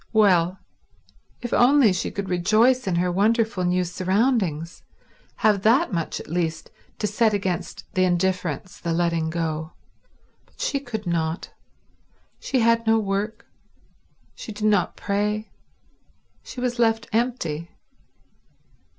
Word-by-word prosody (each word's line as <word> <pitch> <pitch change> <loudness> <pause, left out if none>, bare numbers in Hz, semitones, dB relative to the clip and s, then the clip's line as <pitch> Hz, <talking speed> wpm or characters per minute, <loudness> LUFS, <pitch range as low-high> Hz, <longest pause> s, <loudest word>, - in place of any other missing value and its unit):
Well, 185 -4 +4 0.9
if 240 - -3
only 250 -4 +5
she 185 - -2
could 200 -1 -5
rejoice 215 +8 +3
in 185 - +1
her 180 +1 +1
wonderful 215 0 +1
new 180 +1 +2
surroundings, 185 - 0 0.5
have 210 -3 +2
that 235 - +3
much 165 -2 -2
at - - -10
least 165 -1 -2 0.3
to - - -2
set 215 +1 +2
against 190 -4 -3
the 185 - +2
indifference, 180 -2 -1
the 170 -1 -2
letting 165 -1 0
go—but 160 -1 -8
she 280 - 0
could 235 -6 -6
not. 165 -1 -2 0.9
She 260 - 0
had 230 0 +2
no 225 0 +5
work; 210 +2 -2 0.9
she - - -8
did 210 0 -4
not 205 -4 +2
pray; 210 +2 -2 0.9
she - - -9
was 245 -1 -2
left 225 -1 +2
empty. 175 -10 -1
200 Hz, 125 wpm, -24 LUFS, 175-225 Hz, 0.9 s, only